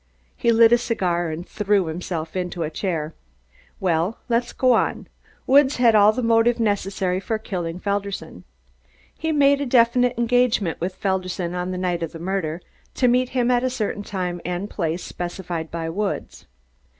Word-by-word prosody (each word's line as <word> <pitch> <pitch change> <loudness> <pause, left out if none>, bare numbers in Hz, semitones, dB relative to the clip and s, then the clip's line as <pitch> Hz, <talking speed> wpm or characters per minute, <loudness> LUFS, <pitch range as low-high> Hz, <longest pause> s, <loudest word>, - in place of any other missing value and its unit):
He 235 - +2
lit 230 0 +6
a 240 - +5
cigar 180 -8 -1
and 160 +3 -6
threw 205 -3 +1
himself 160 0 -5
into 180 -2 -2
a 155 - -3
chair. 160 -3 -3 0.7
"Well, 175 +3 0
let's 240 +1 +1
go 255 -1 +3
on. - - 0 0.4
Woods 275 +1 +5
had 240 -2 +4
all 210 0 +6
the 245 +3 -3
motive 230 +1 +3
necessary 195 -4 0
for 220 +3 -2
killing 180 -5 -4
Felderson. 200 0 -4 0.7
He 320 - -2
made 285 -1 +4
a - - -1
definite 245 0 +3
engagement 235 -8 +1
with 185 +2 -2
Felderson 185 -2 -2
on 180 0 -3
the 185 - -3
night 180 -2 -1
of 165 - -4
the 165 - -8
murder, 175 -2 -3 0.3
to 250 - +2
meet 250 +1 +2
him 245 0 +2
at 245 0 +2
a 255 - +1
certain 220 -5 -3
time 180 -3 -4
and 180 +3 -4
place 170 -1 -2
specified 175 -2 -5
by 165 -1 -4
Woods. 195 +5 -4
195 Hz, 170 wpm, -22 LUFS, 175-235 Hz, 0.7 s, lit